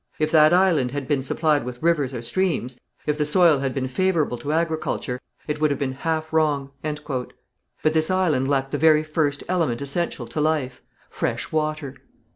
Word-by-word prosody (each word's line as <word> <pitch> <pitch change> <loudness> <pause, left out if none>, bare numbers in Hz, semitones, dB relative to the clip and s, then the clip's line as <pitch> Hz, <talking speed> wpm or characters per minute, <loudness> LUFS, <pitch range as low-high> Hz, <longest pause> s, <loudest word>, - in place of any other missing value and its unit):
If 155 0 0
that 155 -1 +6
island 175 -8 +3
had 140 0 -5
been 140 -2 +1
supplied 150 +2 +1
with 125 +3 -7
rivers 155 -6 +2
or 120 -3 -6
streams, 130 -6 -1 0.3
if 150 0 -1
the - - +3
soil 155 -1 +4
had 135 -1 -1
been 130 0 -2
favourable 160 -3 0
to 140 +5 -3
agriculture, 160 -6 -1 0.3
it 150 0 -3
would 155 - +4
have 140 - -1
been 135 -2 -1
half 160 +3 -3
wrong." 145 -3 +1
But 150 -4 -4 0.6
this 160 0 +3
island 165 -8 +1
lacked 135 -1 0
the 145 - -1
very 155 -1 +5
first 150 -2 -1
element 165 -10 0
essential 140 +5 -3
to 155 - -3
life, 150 -5 -1 0.3
fresh - - -3
water. 155 -3 -2
150 Hz, 180 wpm, -23 LUFS, 135-160 Hz, 0.6 s, that